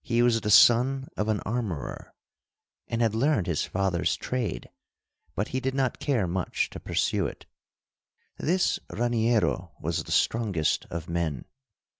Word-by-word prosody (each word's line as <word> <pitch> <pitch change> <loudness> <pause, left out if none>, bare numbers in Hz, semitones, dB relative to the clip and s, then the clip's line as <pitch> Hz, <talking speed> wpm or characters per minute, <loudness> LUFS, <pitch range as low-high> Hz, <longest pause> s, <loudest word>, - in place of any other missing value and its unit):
He 120 0 +2
was 115 -2 +3
the 105 - -2
son 130 +5 +5
of 105 - -1
an 110 -2 0
armorer, 105 - -4 0.7
and 115 0 0
had 110 -2 +2
learned 115 - +2
his 85 -4 -1
father's 95 -2 0
trade, 125 -3 -3 0.7
but 105 - -2
he 130 - -1
did 130 0 -2
not 135 -2 0
care 130 -9 +1
much 90 0 -1
to - - -7
pursue - - 0
it. - - -10 0.9
This 180 +3 +1
Raniero 115 -7 0
was 85 +1 -2
the - - -9
strongest 100 -10 +1
of 85 0 -5
men. 85 -5 -2
110 Hz, 145 wpm, -27 LUFS, 90-120 Hz, 0.9 s, son